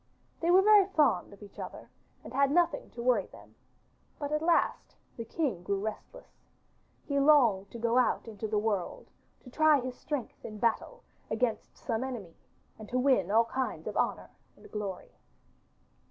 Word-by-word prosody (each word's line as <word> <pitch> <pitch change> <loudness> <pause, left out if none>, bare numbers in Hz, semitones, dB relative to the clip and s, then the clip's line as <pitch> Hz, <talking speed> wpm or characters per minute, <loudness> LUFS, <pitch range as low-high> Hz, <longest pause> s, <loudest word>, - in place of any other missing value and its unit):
They 335 - 0
were 370 +2 +6
very 415 -2 +6
fond 300 - +2
of 200 +1 -14
each 200 - -14
other - - -8 0.4
and - - -10
had 275 +1 +3
nothing 345 +4 +1
to 235 - -5
worry 250 0 +2
them, - - -16 0.6
but 290 -1 -4
at 300 0 0
last 335 +1 +1 0.2
the 230 - -5
king 255 - -2
grew 195 +2 -2
restless. 220 - -8 0.6
He 280 -1 0
longed 245 -10 +4
to - - -9
go 235 +2 +2
out 250 - +1
into 220 -1 -5
the 215 0 -1
world, 205 -4 -2 0.3
to 250 - -14
try 310 +1 +4
his 255 0 -4
strength 290 -5 -5
in 215 - -7
battle 235 - -1 0.3
against 225 +1 -2
some 225 +1 -2
enemy 230 -10 -6 0.4
and 215 - -10
to 250 - -1
win 250 -8 +2
all 225 +3 +4
kinds 260 +2 -3
of - - -5
honour - - -1 0.3
and - - -16
glory. 200 -3 -5
245 Hz, 170 wpm, -30 LUFS, 215-295 Hz, 0.6 s, were